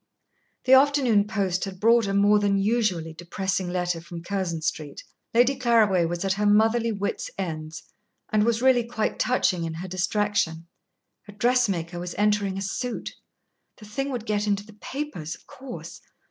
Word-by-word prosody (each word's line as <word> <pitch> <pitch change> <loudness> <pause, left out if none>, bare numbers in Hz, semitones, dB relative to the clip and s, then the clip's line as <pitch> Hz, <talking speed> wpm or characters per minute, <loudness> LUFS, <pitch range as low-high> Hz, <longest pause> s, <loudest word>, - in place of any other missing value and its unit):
The 260 - +5
afternoon 265 -7 +4
post 195 -4 -1
had 190 -2 -8
brought 230 0 +4
a 195 - -1
more 205 +1 +5
than 200 -1 +2
usually 195 -6 0
depressing 185 +2 -3
letter 175 -2 -1
from 170 0 -9
Curzon 175 -4 -3
Street. 155 -2 -4 0.3
Lady 245 +4 +4
Claraway 220 -8 +3
was 175 +3 -3
at 190 - +2
her 210 +2 -1
motherly 225 +3 +3
wits' 200 -1 -3
ends, 160 -4 -5 0.5
and 210 -1 +4
was 235 +1 +1
really 255 -2 +5
quite 230 -2 -2
touching 190 -8 +1
in 165 -1 -4
her 175 +3 -6
distraction. 185 -2 -1 0.6
A - - -9
dressmaker 200 -7 0
was 175 0 -6
entering 205 -2 +1
a 195 - -3
suit. 240 +5 -4 0.6
The 215 - -13
thing 270 +7 -3
would 245 -5 -4
get 210 -1 -1
into 200 0 0
the 215 - -15
papers, 215 - -5
of - - -22
course. 260 -1 -9
205 Hz, 165 wpm, -25 LUFS, 180-230 Hz, 0.6 s, The